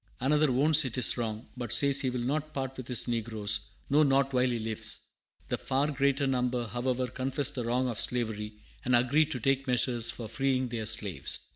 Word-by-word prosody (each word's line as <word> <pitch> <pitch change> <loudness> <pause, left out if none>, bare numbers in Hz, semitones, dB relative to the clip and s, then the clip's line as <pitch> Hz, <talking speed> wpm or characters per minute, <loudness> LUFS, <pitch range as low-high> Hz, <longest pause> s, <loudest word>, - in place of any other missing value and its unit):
Another 150 +3 +3
"owns 150 +5 +4
it 130 -2 -2
is 125 - +2
wrong, 115 -1 -4
but 120 -3 -5
says 140 +3 +4
he 130 - 0
will 125 -1 -3
not 155 +4 -2
part 135 -1 -3
with 130 -2 -8
his 125 -2 0
negroes, 110 -3 -1 0.3
no, 145 +2 +4
not 135 -2 +3
while 125 0 +3
he 120 - -1
lives." 110 -1 -4 0.5
The - - -1
far 140 +3 0
greater 140 0 +1
number, 125 -2 0
however, 125 +3 -1
confess 130 +2 -2
the 125 -3 -4
wrong 125 +2 +1
of 120 -4 -2
slavery, 110 -3 -1 0.3
and 125 -2 +3
agree 135 +6 +3
to 145 -5 -3
take 135 +3 +1
measures 120 -2 +1
for 115 - -5
freeing 130 +1 0
their 115 -2 -3
slaves. 95 -12 -1
125 Hz, 195 wpm, -29 LUFS, 120-135 Hz, 0.5 s, owns